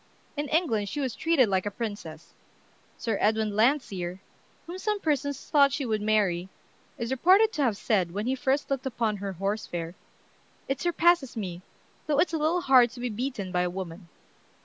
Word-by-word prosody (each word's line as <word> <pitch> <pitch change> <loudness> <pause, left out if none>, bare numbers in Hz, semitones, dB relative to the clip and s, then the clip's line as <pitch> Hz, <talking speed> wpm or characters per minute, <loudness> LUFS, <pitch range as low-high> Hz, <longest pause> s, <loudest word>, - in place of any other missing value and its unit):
In 290 0 -2
England 230 - +1
she 295 - -4
was 260 -4 -1
treated 300 0 +3
like 190 0 0
a - - +1
princess. 205 -8 -7 0.6
Sir 225 -3 -2
Edwin 215 -1 +1
Landseer, 205 -7 +1 0.5
whom 355 +2 -7
some 420 +1 -1
persons 285 -4 -1
thought 280 -2 +5
she 275 - -2
would 215 -3 -1
marry, 200 -4 +1 0.5
is 235 -1 -4
reported 380 - +4
to 300 - -2
have 235 -7 +1
said, 190 -6 +1
when 205 +4 -3
he 255 - +1
first 265 +2 -1
looked 270 -1 -1
upon 225 -4 -1
her 195 0 -4
"Horse 195 +4 -2
Fair," 170 -1 -5 0.7
"It 270 0 -2
surpasses 345 -6 +2
me, 180 -5 -5 0.5
though 295 -2 +1
it's 330 +2 +2
a 320 - 0
little 325 +4 +1
hard 255 -5 +6
to 250 - -10
be 245 0 -2
beaten 220 -4 -4
by 180 -1 +1
a 180 - 0
woman." 175 -1 -7
235 Hz, 185 wpm, -27 LUFS, 200-285 Hz, 0.7 s, hard